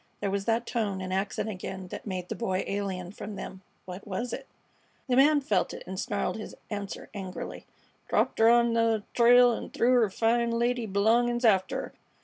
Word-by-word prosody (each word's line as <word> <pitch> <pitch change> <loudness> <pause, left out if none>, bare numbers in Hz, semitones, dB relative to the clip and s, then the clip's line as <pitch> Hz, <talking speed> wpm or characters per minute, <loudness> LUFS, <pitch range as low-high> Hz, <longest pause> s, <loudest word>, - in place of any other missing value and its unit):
There 200 -1 -1
was 200 0 -2
that 230 +1 +1
tone 210 -6 -2
and 185 0 -4
accent 195 +2 -1
again 190 -2 -6
that - - -8
made 185 -2 -4
the - - -4
Boy 190 -5 -1
alien 190 -3 -3
from 205 0 -7
them. 190 0 -8 0.2
What 185 +3 -9
was 225 +5 -3
it? 270 - -6 0.6
The 250 - +2
man 290 +3 +5
felt 210 -8 0
it - - -9
and 190 0 -6
snarled 205 +1 -2
his 215 - -8 0.2
answer 205 -1 -5
angrily. 190 -3 -7 0.4
"Dropped - - +1
'er 225 +1 +7
on 235 0 +4
th' 230 -2 +2
trail, 245 0 +6
an' - - -5
threw 245 - +2
her 235 -4 +4
fine 235 +4 +1
lady 235 0 0
b'longin's 235 +5 +2
after 190 -4 +3
'er. - - -7
215 Hz, 190 wpm, -28 LUFS, 190-235 Hz, 0.6 s, er